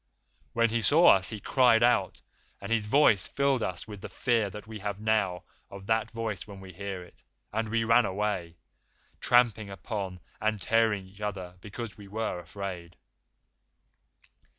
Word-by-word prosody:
When 115 -1 +2
he 115 0 0
saw 160 - +7
us 95 - -3
he 110 - -5
cried 120 +1 +4
out, 120 -6 +2 0.4
and 100 +3 -7
his 110 -2 +1
voice 115 -6 +5
filled 140 -3 +1
us 90 -1 -3
with 105 -3 -9
the - - -7
fear 115 -5 +1
that 105 +2 -9
we 110 0 -8
have 100 0 -4
now 105 -5 0 0.3
of 100 0 -10
that 110 +1 +1
voice 115 -4 -4
when 100 -2 -10
we 95 -1 -11
hear 95 0 -5
it, 90 - -19 0.3
and 110 0 -1
we 115 +1 +1
ran 115 -1 +4
away, 95 -4 -2 0.6
tramping 120 -4 +3
upon 95 -2 -5 0.2
and 110 -1 0
tearing 110 0 +2
each 95 +2 -16
other 95 -4 -4
because 105 +2 -7
we 100 - -11
were 105 -2 -3
afraid. 90 -1 -7
105 Hz, 165 wpm, -29 LUFS, 95-115 Hz, 0.6 s, saw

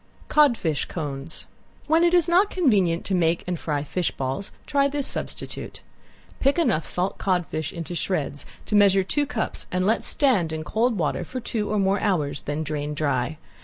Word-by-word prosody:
~CODFISH 240 - +3
CONES~ 145 -2 -5 0.4
When 320 +2 +3
it 345 +1 +4
is 345 -2 +4
not 365 +4 +4
convenient 200 - +2
to 195 - -2
make 170 -2 +2
and 180 -2 -3
fry 145 -3 -2
fish 175 +4 -1
balls 135 +9 -4
try 280 -1 +2
this 280 -1 -2
substitute. - - -5 0.6
Pick 275 +4 +2
enough 230 - +1
salt 180 +2 -2
codfish 175 -5 -1
into 170 +1 -6
shreds 155 -4 -2 0.2
to 210 - -1
measure 195 -2 +5
two 290 +9 0
cups 245 -6 -3
and 185 0 0
let 220 +3 +2
stand 215 - +2
in 160 0 -3
cold 225 +6 +1
water 165 +1 0
for 255 +9 -5
two 220 -3 -3
or 210 - 0
more 195 0 +2
hours, 150 -9 0
then 145 +2 -3
drain 150 -1 -3
dry. 145 0 -1
185 Hz, 175 wpm, -24 LUFS, 155-240 Hz, 0.6 s, measure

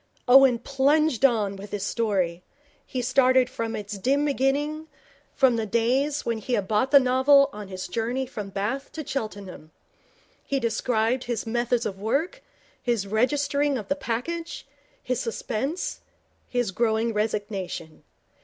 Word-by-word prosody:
Owen 260 -1 +7
plunged 275 +2 +1
on 215 -7 +3
with 200 +1 -9
his 205 -1 -3
story. 190 -7 -1 0.5
He 250 -1 -3
started 255 0 +3
from 230 -2 -3
its 205 -1 -6
dim 280 +8 +1
beginning, 290 +3 0 0.5
from 260 -4 +4
the 220 -1 -2
days 260 +7 +1
when 230 -1 -1
he 245 +4 -4
had 205 -5 0
bought 220 +5 +1
the 280 0 +8
novel 275 +2 +4
on 210 -1 -8
his 185 -1 -6
journey 235 +7 -2
from 215 -6 -7
Bath 210 +8 -3
to 310 -1 -6
Cheltenham. 205 - -6 0.7
He 275 - -1
described 230 +1 0
his 240 -2 -3
methods 240 +1 0
of 195 -1 -4
work, 315 - -1 0.4
his 235 -5 0
registering 280 +6 +1
of 215 - -7
the 285 - +2
package, 330 +7 -4 0.4
his 255 -1 -1
suspense, 255 +7 -3 0.5
his 245 -5 -1
growing 225 +2 0
resignation. 205 -6 -3
240 Hz, 145 wpm, -25 LUFS, 215-275 Hz, 0.7 s, the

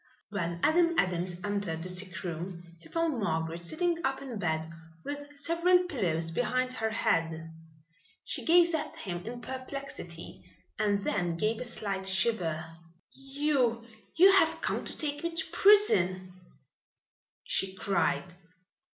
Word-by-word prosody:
When 170 -4 -2
Adam 335 +1 +4
Adams 180 - 0
entered 200 -6 -2
the 180 - -5
sick 185 0 -6
room 175 0 -5 0.2
he 165 - -17
found 330 -6 0
Margaret 165 -3 -2
sitting 335 - -1
up 270 0 0
in 260 -6 -6
bed 160 -4 -1 0.4
with 290 0 -7
several 340 +4 +3
pillows 170 - -1
behind 255 +6 0
her 220 -3 -1
head. 165 -6 0 0.7
She - - -2
gazed 345 0 +5
at 315 - -2
him 175 -2 -5
in 240 +1 -6
perplexity 265 +2 -7 0.4
and 205 -2 +1
then 175 -4 -1
gave 215 +5 0
a - - -1
slight 200 -5 -3
shiver. 190 -5 0 0.5
"You 270 -4 0 0.3
you 375 +4 +8
have 325 -4 +4
come - - -1
to - - -4
take 290 -2 -1
me 335 0 -3
to 325 - 0
prison," 185 - +4 1.1
she 190 0 -1
cried. 190 -2 0
215 Hz, 135 wpm, -30 LUFS, 175-290 Hz, 1.1 s, you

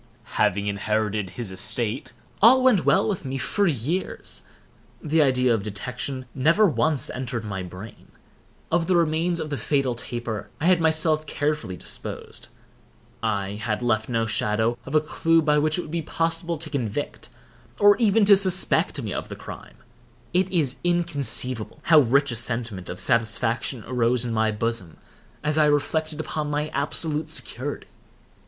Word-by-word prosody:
Having 100 +2 +1
inherited 105 0 -1
his 105 +1 -7
estate, 115 +7 -1 0.3
all 255 +5 +7
went 245 -8 +4
well 195 +3 +3
with 200 -6 -2
me 135 -1 -4
for 200 +9 0
years. 155 - -3 0.6
The 160 0 +1
idea 130 -3 +3
of 110 - 0
detection 125 +6 -5
never 165 +11 +3
once 155 -5 0
entered 125 -3 -4
my 95 -2 -4
brain. 90 +4 -11 0.6
Of 165 0 +1
the 185 - +2
remains 170 +1 +1
of 155 -2 -5
the 145 - -2
fatal 130 +3 0
taper 120 -2 -5
I 160 - -2
had 180 -1 +4
myself 155 -1 +2
carefully 145 -12 -2
disposed. - - -6 0.7
I 100 -2 -2
had 110 +2 -2
left 110 -2 0
no 115 -2 0
shadow 110 +2 +1
of 140 - -4
a 155 - +5
clew 165 +1 +1
by 150 -2 +2
which 155 +2 +1
it - - -1
would 150 - -10
be 170 0 -2
possible 165 +1 -2
to 155 +1 -5
convict, 130 -1 -4 0.5
or 205 0 +6
even 220 -2 +3
to 200 0 +8
suspect 190 -1 +4
me - - -4
of - - -5
the - - -6
crime. - - -11 0.6
It 185 +1 +2
is 155 -8 0
inconceivable 145 -9 +1
how 160 -2 +6
rich 140 +1 +3
a - - -3
sentiment 115 -5 -1
of 90 - -6
satisfaction 115 +1 +1
arose 125 0 +1
in 120 - -3
my 110 0 +1
bosom 110 -5 -2 0.5
as 150 +1 +1
I 155 - +5
reflected 150 +2 0
upon 155 -1 -3
my 150 +1 -2
absolute 150 +2 -1
security. 145 -3 -4
140 Hz, 160 wpm, -24 LUFS, 115-160 Hz, 0.7 s, to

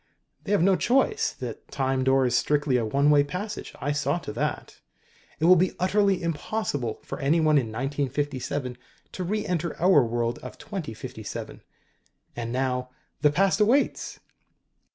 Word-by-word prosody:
"They 200 - -3
have 205 -5 +3
no 195 0 +5
choice. 270 - +2
The - - -6
Time 135 -1 0
Door 135 0 +3
is 120 -1 +1
strictly 145 -1 +2
a 120 - 0
one 140 +7 +3
way 145 -1 +6
passage. 185 +8 -6
I 145 - -1
saw 145 +2 0
to - - -6
that. - - -3 0.6
It 160 - +1
will 180 +2 +8
be 180 +1 +1
utterly 195 0 +2
impossible 155 - -2
for - - -6
anyone 155 +1 +3
in 120 - -3
1957 135 +1 -3 0.3
to 185 - -4
re 210 +4 -2
enter 170 -2 -2
our 175 -5 +5
world 120 0 -1
of 125 - -9
2057. 165 - -7 0.7
And 115 -1 -4
now 125 0 -1 0.3
the 150 - +5
Past 190 +6 +2
awaits!" 240 +7 +1
145 Hz, 155 wpm, -26 LUFS, 130-185 Hz, 0.7 s, will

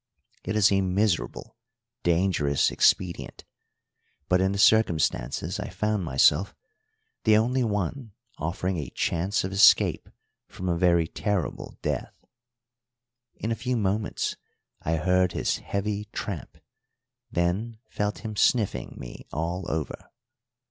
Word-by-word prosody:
It 105 - -3
is 105 -1 +5
a 95 0 +3
miserable, 95 - -1 0.5
dangerous 85 -5 +2
expedient, 90 -3 +1 0.8
but, 90 +1 +3
in 95 0 +2
the 100 - -2
circumstances 95 -4 +2
I - - -4
found 105 +2 -1
myself, 75 +4 +3 0.7
the 110 -1 +5
only 125 +4 +2
one 105 +2 -2 0.3
offering 90 +3 -2
a 75 -6 -4
chance 90 +5 -1
of 95 - -3
escape 95 +1 +5 0.4
from 95 - -7
a 85 - +1
very 85 -2 +3
terrible 100 0 -3
death. - - -3 1.2
In 115 - -3
a - - +1
few 125 +1 -2
moments 105 0 -1 0.4
I 80 - 0
heard 90 +2 +2
his - - 0
heavy 105 +1 -3
tramp, 100 - -6 0.7
then 95 +7 -1
felt 105 +2 -3
him 110 -1 -4
sniffing 110 0 +1
me - - -10
all 85 +4 -3
over. 80 -2 -4
95 Hz, 120 wpm, -26 LUFS, 85-105 Hz, 1.2 s, is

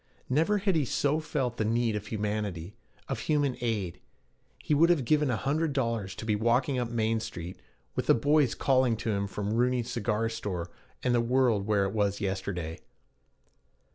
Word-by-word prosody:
Never 165 +10 +3
had 195 -2 +1
he 155 - +3
so 145 +4 +1
felt 135 -6 -2
the - - +1
need 115 0 +1
of 105 0 -4
humanity, 105 -4 -3 0.3
of 135 - -3
human 145 -3 +1
aid. 105 -7 -2 0.6
He - - -1
would 165 +4 +5
have 160 -8 +3
given 150 +2 +3
a 120 - +1
hundred 150 +6 0
dollars 115 -8 -1
to 110 - -7
be 110 -2 +1
walking 125 +4 +1
up 120 -1 -2
Main 115 -1 0
Street, 90 -5 -7 0.4
with - - -2
the - - +6
boys 145 +1 +3
calling 130 -4 +2
to 110 - -2
him 100 -1 -1
from 105 +1 -3
Rooney's 125 0 +1
cigar 115 -1 0
store, 95 -7 -4 0.3
and 125 - +2
the 120 - +3
world 115 -4 +2
where 105 -2 +2
it 95 - -3
was 100 -2 0
yesterday. 95 -4 -3
115 Hz, 180 wpm, -29 LUFS, 105-130 Hz, 0.6 s, the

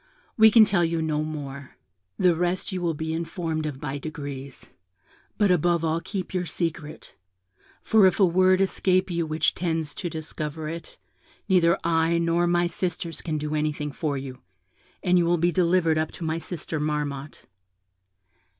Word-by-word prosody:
We 220 0 +7
can 220 0 +7
tell 195 -4 +2
you 165 0 0
no 155 -1 0
more; 140 -3 -6 0.4
the 180 -2 +4
rest 180 +4 -1
you 185 -1 -3
will 170 -2 0
be 160 +1 -3
informed 165 -1 -3
of 140 -3 -6
by 140 0 -4
degrees; 140 -3 -7 0.7
but 205 -3 +3
above 175 -1 +2
all 165 +1 0
keep 190 -1 -5
your 180 -1 -1
secret; 160 -2 -4 0.7
for 215 -3 +5
if 185 - 0
a 195 - +7
word 185 +2 +4
escape 185 -1 +1
you 170 -1 -1
which 155 0 +1
tends 160 -4 -2
to 175 - -4
discover 155 -1 -5
it, 165 +2 -7 0.5
neither 180 -2 +4
I 165 0 +2
nor 170 +1 +1
my 175 0 +2
sisters 170 -1 -3
can 155 -2 -2
do 150 0 -3
anything 150 -1 -1
for 145 -1 -2
you, 130 -1 -7 0.6
and 180 -1 +4
you 170 - +2
will 175 +1 +3
be 170 +2 +2
delivered 170 -3 +2
up 155 - -1
to - - -8
my 160 0 -1
sister 160 -2 -5
Marmotte.' 150 -2 -3
165 Hz, 170 wpm, -25 LUFS, 155-175 Hz, 0.7 s, We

